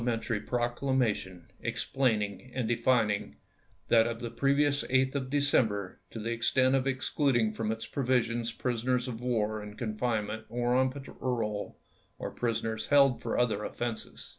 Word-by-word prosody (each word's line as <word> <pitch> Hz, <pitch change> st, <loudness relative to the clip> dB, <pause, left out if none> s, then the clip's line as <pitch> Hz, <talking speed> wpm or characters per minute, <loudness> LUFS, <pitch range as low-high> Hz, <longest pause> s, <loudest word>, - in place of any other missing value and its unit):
mentary 115 Hz, -2 st, -1 dB
proclamation 120 Hz, -7 st, -1 dB, 0.2 s
explaining 115 Hz, -2 st, -1 dB
and 125 Hz, -4 st, 0 dB
defining 115 Hz, -3 st, +1 dB, 0.5 s
that 115 Hz, -1 st, +5 dB
of 115 Hz, -1 st, -3 dB
the 120 Hz, -1 st, -5 dB
previous 140 Hz, +1 st, +2 dB
8th 130 Hz, 0 st, +2 dB
of 135 Hz, -2 st, -2 dB
December 115 Hz, -9 st, +1 dB
to -, -, -9 dB
the 115 Hz, +1 st, -3 dB
extent 130 Hz, +3 st, +3 dB
of 135 Hz, 0 st, +2 dB
excluding 130 Hz, -4 st, +1 dB
from 110 Hz, 0 st, -2 dB
its 110 Hz, 0 st, -4 dB
provisions 120 Hz, -3 st, 0 dB
prisoners 125 Hz, +1 st, -1 dB
of 120 Hz, -2 st, -5 dB
war 110 Hz, -3 st, 0 dB
in 105 Hz, 0 st, -9 dB
confinement 110 Hz, -2 st, -2 dB
or 120 Hz, +1 st, 0 dB
on 130 Hz, 0 st, +4 dB
parole, 125 Hz, -6 st, -3 dB, 0.4 s
or -, -, -5 dB
prisoners 115 Hz, -2 st, -2 dB
held 135 Hz, -4 st, +5 dB
for -, -, -2 dB
other 110 Hz, -4 st, +1 dB
offenses. 120 Hz, 0 st, -5 dB
120 Hz, 140 wpm, -30 LUFS, 110-130 Hz, 0.5 s, that